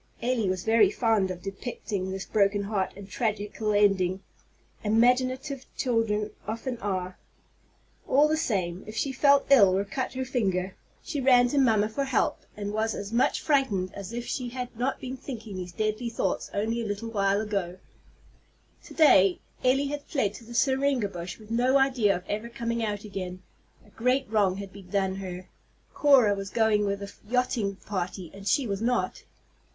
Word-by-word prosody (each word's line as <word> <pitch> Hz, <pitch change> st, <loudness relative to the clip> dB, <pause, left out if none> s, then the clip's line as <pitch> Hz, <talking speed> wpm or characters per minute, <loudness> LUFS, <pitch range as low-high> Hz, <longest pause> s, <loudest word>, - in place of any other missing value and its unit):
Elly 235 Hz, -4 st, 0 dB
was 185 Hz, -1 st, -2 dB
very 220 Hz, -3 st, +5 dB
fond 220 Hz, -3 st, +1 dB
of 180 Hz, -1 st, -6 dB
depicting 195 Hz, -1 st, -4 dB
this 190 Hz, 0 st, -4 dB
broken 200 Hz, -1 st, +2 dB
heart 200 Hz, -2 st, -1 dB
and 200 Hz, -1 st, -9 dB
tragical 210 Hz, 0 st, -2 dB
ending, 195 Hz, -3 st, +2 dB, 0.6 s
imaginative 255 Hz, +5 st, +1 dB
children 220 Hz, -4 st, 0 dB, 0.2 s
often 230 Hz, +3 st, -4 dB
are. 185 Hz, -2 st, -3 dB, 0.9 s
All 290 Hz, +3 st, +5 dB
the 310 Hz, -, +1 dB
same, 190 Hz, -, -1 dB
if 215 Hz, -, -8 dB
she 275 Hz, -, 0 dB
felt 280 Hz, +1 st, +4 dB
ill, 200 Hz, -8 st, +7 dB
or 200 Hz, -, 0 dB
cut 255 Hz, +7 st, -3 dB
her 260 Hz, 0 st, -3 dB
finger, 195 Hz, -7 st, -1 dB, 0.3 s
she 290 Hz, -3 st, -3 dB
ran 250 Hz, -2 st, +5 dB
to 285 Hz, -, +1 dB
mamma 220 Hz, -5 st, +4 dB
for 275 Hz, +6 st, -2 dB
help, 265 Hz, -4 st, +1 dB, 0.2 s
and 205 Hz, 0 st, -4 dB
was 220 Hz, 0 st, 0 dB
as 200 Hz, +2 st, -6 dB
much 240 Hz, -, +2 dB
frightened 245 Hz, -, +1 dB
as 200 Hz, 0 st, -7 dB
if 240 Hz, +1 st, -4 dB
she 250 Hz, -2 st, -3 dB
had 250 Hz, -1 st, -6 dB
not 250 Hz, +4 st, -1 dB
been 260 Hz, +1 st, -6 dB
thinking 225 Hz, -7 st, -7 dB
these 180 Hz, -1 st, -6 dB
deadly 215 Hz, +5 st, -2 dB
thoughts 230 Hz, -, -2 dB
only 225 Hz, +3 st, -1 dB
a -, -, -3 dB
little 205 Hz, +3 st, -4 dB
while 200 Hz, 0 st, +1 dB
before. 190 Hz, -4 st, -3 dB, 1.1 s
To -, -, -11 dB
day 195 Hz, -, +6 dB, 0.2 s
Elly 265 Hz, +2 st, +3 dB
had 290 Hz, 0 st, -3 dB
fled 215 Hz, -10 st, 0 dB
to 230 Hz, -, -11 dB
the 235 Hz, +1 st, -10 dB
syringa 265 Hz, -4 st, +2 dB
bush 180 Hz, -1 st, -7 dB
with 215 Hz, 0 st, -14 dB
no 250 Hz, +4 st, +3 dB
idea 255 Hz, -7 st, +3 dB
of 180 Hz, +1 st, -7 dB
ever 215 Hz, +3 st, -3 dB
coming 235 Hz, -2 st, -2 dB
out 210 Hz, -2 st, -2 dB
again. 185 Hz, -3 st, -6 dB, 0.4 s
A -, -, -21 dB
great 255 Hz, +4 st, +1 dB
wrong 200 Hz, -4 st, +2 dB
had 195 Hz, -1 st, -7 dB
been 195 Hz, -2 st, -13 dB
done 190 Hz, -1 st, 0 dB
her. 185 Hz, -1 st, -7 dB, 0.5 s
Cora 265 Hz, -8 st, +5 dB
was 195 Hz, -1 st, -5 dB
going 215 Hz, -2 st, +2 dB
with 200 Hz, 0 st, -2 dB
a 200 Hz, -, -8 dB, 0.2 s
yachting 240 Hz, -5 st, 0 dB
party, 185 Hz, -3 st, -5 dB
and 195 Hz, +1 st, -9 dB
she 275 Hz, -, +2 dB
was 200 Hz, -2 st, -3 dB
not. 245 Hz, +2 st, -1 dB
215 Hz, 175 wpm, -27 LUFS, 195-250 Hz, 1.1 s, ill